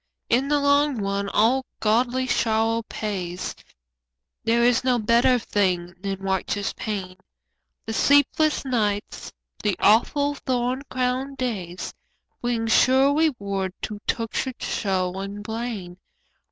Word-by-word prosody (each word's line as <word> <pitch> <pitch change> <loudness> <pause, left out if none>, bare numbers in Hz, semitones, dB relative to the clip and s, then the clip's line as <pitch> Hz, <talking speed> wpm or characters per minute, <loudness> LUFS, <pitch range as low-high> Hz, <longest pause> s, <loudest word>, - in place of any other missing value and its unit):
In 255 +4 +2
the 295 0 +2
long 285 -1 +3
run 200 0 -1
all 240 +7 +3 0.2
godly 245 +4 +1
sorrow 225 -2 +1
pays, 185 -4 -4 0.9
There 235 +1 +2
is 245 0 +3
no 250 -1 +2
better 235 +3 +4
thing 185 -6 0
than 195 -1 -3
righteous 195 +1 -1
pain, 190 -4 -4 0.7
The 225 - -4
sleepless 285 +4 +3
nights, 210 -5 -2 0.3
the 205 -3 +1
awful 285 +6 +3
thorn 255 -1 -1
crowned 255 +2 -1
days, 190 -8 -4 0.5
Bring 240 -2 -1
sure 260 +5 +4
reward 200 - 0
to 210 -1 -4
tortured 235 +2 -2
soul 190 -2 -1
and 200 +1 -6
brain. 220 -5 -5
225 Hz, 115 wpm, -24 LUFS, 200-255 Hz, 0.9 s, better